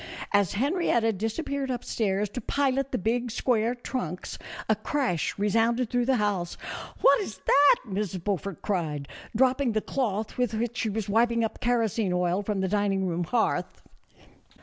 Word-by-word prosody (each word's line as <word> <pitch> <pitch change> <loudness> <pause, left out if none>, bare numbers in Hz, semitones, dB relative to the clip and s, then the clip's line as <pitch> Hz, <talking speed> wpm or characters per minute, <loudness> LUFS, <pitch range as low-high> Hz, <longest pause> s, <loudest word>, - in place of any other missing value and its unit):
As 200 -3 +3
Henrietta 245 - +1
disappeared 270 - -2
up 245 -2 -2
stairs 205 -2 0
to 250 - -5
pilot 275 +2 0
the 255 - 0
big 235 +5 0
square 235 0 +1
trunks, 240 - -5 0.3
a 220 - +3
crash 220 - -1
resounded 225 +4 +1
through 245 -1 +2
the 265 - +4
house. 205 -6 -1 0.5
"What - - +6
is 220 - -5
that?" 285 - +6
Mrs. 195 -3 -3
Beaufort 195 -2 -3
cried, 155 -8 -2 0.3
dropping 260 0 +3
the 215 - +2
cloth 220 -4 -2
with 240 -3 +1
which 235 +1 -2
she 225 - -1
was 210 0 -3
wiping 230 +2 +2
up 225 - -3
kerosene 225 -5 +1
oil 180 +2 +1
from 205 -1 -2
the 190 - +1
dining 195 -1 +1
room 175 -1 -1
hearth. 230 +6 -1
220 Hz, 160 wpm, -27 LUFS, 195-245 Hz, 0.5 s, What